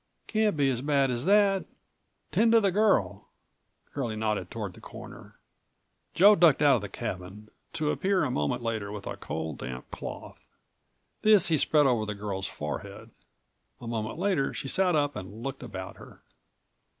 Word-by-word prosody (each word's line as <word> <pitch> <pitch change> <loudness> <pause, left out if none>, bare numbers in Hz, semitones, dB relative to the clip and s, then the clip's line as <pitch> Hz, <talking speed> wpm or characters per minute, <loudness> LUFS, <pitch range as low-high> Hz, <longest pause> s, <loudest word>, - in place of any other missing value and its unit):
"Can't 215 -5 +1
be 140 -2 +3
as 120 -1 -2
bad 140 -2 +2
as 120 +2 -2
that. 200 -1 +4 0.7
Tend 225 +1 +3
to 230 - +7
the 200 -3 +2
girl," 125 - +1 0.7
Curlie 120 -6 -3
nodded 110 -1 -2
toward - - -5
the - - -15
corner. - - -11 0.8
Joe 205 +4 +7
ducked 160 -5 +5
out 140 -3 +6
of - - -5
the 100 - -6
cabin, 95 +3 -6 0.2
to 155 -2 0
appear 190 -1 +1
a 135 - -1
moment 75 +5 -1
later 110 -3 -3
with 105 -1 -7
a - - -4
cold, 80 -1 -5
damp 65 0 -7
cloth. - - -8 0.8
This 210 -5 +5
he 160 - +3
spread 150 +1 +4
over 120 -5 +1
the 105 - -3
girl's 100 -2 -4
forehead. 75 0 -7 0.7
A - - -10
moment 115 0 -3
later 185 -7 0
she - - -4
sat 180 +3 +2
up 145 -1 +1
and 100 +5 -8
looked 135 0 -5
about 95 -7 -7
her. - - -15
130 Hz, 170 wpm, -28 LUFS, -, 0.8 s, to